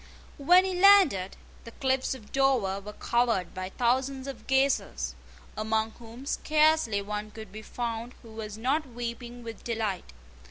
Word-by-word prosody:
When 360 +6 +6
he 380 - -1
landed, 360 - +5 0.3
the - - -9
cliffs 265 -1 0
of 220 -5 -14
Dover 255 -8 +2
were 210 +1 -9
covered 235 -8 0
by 185 0 -5
thousands 260 +4 0
of 275 -3 -8
gazers, 265 - +1 0.4
among 220 +1 0
whom 235 +3 -11
scarcely 305 -9 +2
one 210 +1 -4
could 220 -2 -10
be 215 +2 -8
found 235 +1 -4
who 230 - -13
was 215 -1 -7
not 275 +6 0
weeping 240 0 -6
with 230 -1 -8
delight. 220 - -3
235 Hz, 150 wpm, -28 LUFS, 215-270 Hz, 0.4 s, When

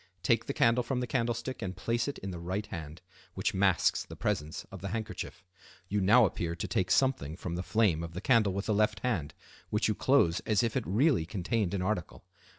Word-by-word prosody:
Take 115 +4 +2
the - - -1
candle 115 +2 +4
from 125 +1 -2
the 125 - -1
candlestick 120 +1 -2
and 95 -3 -4
place 115 +5 -1
it 140 - -4
in 95 - -6
the 85 - -6
right 95 +5 -3
hand, 80 -2 -8 0.3
which - - 0
masks 95 -2 +2
the - - -10
presence 75 +1 -2
of 95 -3 -9
the 100 - -4
handkerchief. 105 -2 -5 0.5
You 105 0 0
now 110 +5 +6
appear 85 -3 -2
to 85 - -4
take 95 - 0
something 130 - +2
from 90 - -5
the 90 - -2
flame 95 -4 +2
of 85 0 -6
the - - -3
candle 115 -6 +4
with 100 +1 -3
the 110 - +1
left 105 -1 +1
hand, 85 - -2 0.3
which 105 +1 +1
you 110 - +2
close 105 -8 +3
as 110 -1 +1
if 115 -2 -1
it 130 - -1
really 110 - +2
contained 100 +1 -1
an 90 - -1
article. 95 -3 -3
100 Hz, 220 wpm, -30 LUFS, 90-115 Hz, 0.5 s, now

